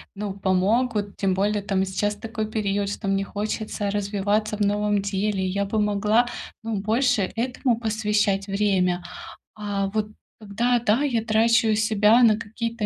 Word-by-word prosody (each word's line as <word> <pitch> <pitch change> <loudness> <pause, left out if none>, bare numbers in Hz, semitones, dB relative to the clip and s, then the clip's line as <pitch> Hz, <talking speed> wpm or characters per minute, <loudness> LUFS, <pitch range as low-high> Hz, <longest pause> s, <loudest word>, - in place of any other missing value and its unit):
ну, 205 -1 -4
помогут. 200 +3 0
Тем 190 -2 +1
более, 205 +2 0
там, 195 -1 0
сейчас 205 +2 -1
такой 220 0 -5
период, 205 -2 -1
что 205 0 -5
мне 195 0 +1
хочется 210 0 -3
развиваться 205 +1 -1
в - - -7
новом 205 0 +1
деле, 200 -1 -1
я 200 +2 -1
бы 215 +2 -1
могла, 210 +3 +2 0.4
ну, 225 -1 -2
больше 215 -1 +1
этому 245 0 0
посвящать 210 -3 0
время. 190 -3 +1 0.5
А 205 -2 -2
вот 210 +1 -2 0.3
когда, 230 +4 0
да, 230 +2 +2
я 245 -6 0
трачу 225 0 +3
себя 215 +2 +4
на 220 -3 +5
какие-то 225 +1 -4
210 Hz, 150 wpm, -24 LUFS, 200-220 Hz, 0.5 s, на